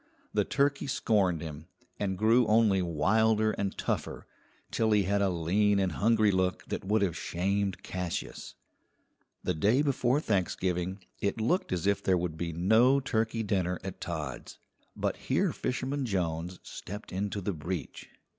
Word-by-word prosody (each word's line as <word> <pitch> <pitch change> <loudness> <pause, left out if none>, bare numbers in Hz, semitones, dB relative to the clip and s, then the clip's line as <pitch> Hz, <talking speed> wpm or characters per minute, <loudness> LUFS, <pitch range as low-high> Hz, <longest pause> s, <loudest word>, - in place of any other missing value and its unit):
The - - +2
turkey 140 0 +1
scorned 95 - +1
him, 80 -1 -8 0.3
and 95 -2 -1
grew 115 +3 +4
only 105 -3 +4
wilder 110 +7 +2
and 100 -2 -3
tougher, - - -3 0.5
till 110 -1 +1
he 105 -1 +4
had 100 +2 +1
a 100 - +3
lean 95 +5 +2
and 95 -2 +1
hungry 110 +4 +3
look 95 -1 0
that - - -3
would 105 +2 +2
have 90 -5 0
shamed 100 +2 -1
Cassius. 90 -2 -5 0.9
The 90 - 0
day 105 - +3
before 135 -1 +2
Thanksgiving 95 - -1 0.2
it 100 +3 -1
looked 150 - 0
as 90 0 -1
if 100 0 +2
there 95 -1 +2
would 85 -2 -2
be 85 +1 -3
no 110 - +4
turkey 115 -3 -1
dinner 90 -3 0
at 95 -1 -7
Todd's, 75 -7 -5 0.4
but - - -1
here - - 0
Fisherman 130 +1 -2
Jones 90 -3 -2
stepped 105 +4 -8
into 100 +2 -2
the 100 +1 -2
breach. 85 +2 -5
100 Hz, 155 wpm, -30 LUFS, 90-110 Hz, 0.9 s, grew